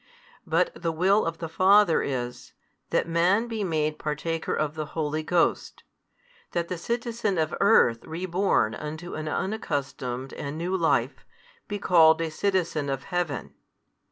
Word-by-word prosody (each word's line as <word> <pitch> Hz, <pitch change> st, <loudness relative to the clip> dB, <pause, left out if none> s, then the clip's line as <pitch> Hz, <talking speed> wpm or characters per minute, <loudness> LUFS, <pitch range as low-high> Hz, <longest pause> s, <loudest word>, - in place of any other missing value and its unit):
But -, -, +2 dB
the 165 Hz, -, -2 dB
will 190 Hz, +6 st, +3 dB
of 165 Hz, 0 st, -3 dB
the 165 Hz, -, -5 dB
Father 190 Hz, +1 st, +4 dB
is, 125 Hz, -3 st, -4 dB, 0.4 s
that -, -, +1 dB
man 180 Hz, +7 st, +2 dB
be 225 Hz, -3 st, -3 dB
made 155 Hz, -4 st, -1 dB
partaker 160 Hz, +2 st, -2 dB
of 150 Hz, -1 st, -1 dB
the 155 Hz, -1 st, -4 dB
Holy 155 Hz, 0 st, -1 dB
Ghost, 170 Hz, +2 st, 0 dB, 0.7 s
that 170 Hz, -1 st, -1 dB
the 180 Hz, -, -3 dB
citizen 230 Hz, -1 st, -2 dB
of 155 Hz, -1 st, 0 dB
earth 160 Hz, -, +4 dB
reborn 175 Hz, -, 0 dB
unto 155 Hz, +3 st, -6 dB
an 155 Hz, 0 st, -4 dB
unaccustomed 140 Hz, -, -3 dB
and 145 Hz, +2 st, -5 dB
new 175 Hz, +3 st, -1 dB
life, 170 Hz, -3 st, +1 dB, 0.4 s
be 205 Hz, -, -3 dB
called 165 Hz, -5 st, +5 dB
a 165 Hz, -1 st, -2 dB
citizen 170 Hz, -5 st, 0 dB
of 135 Hz, 0 st, -3 dB
Heaven. 175 Hz, -4 st, -3 dB
165 Hz, 145 wpm, -26 LUFS, 155-185 Hz, 0.7 s, called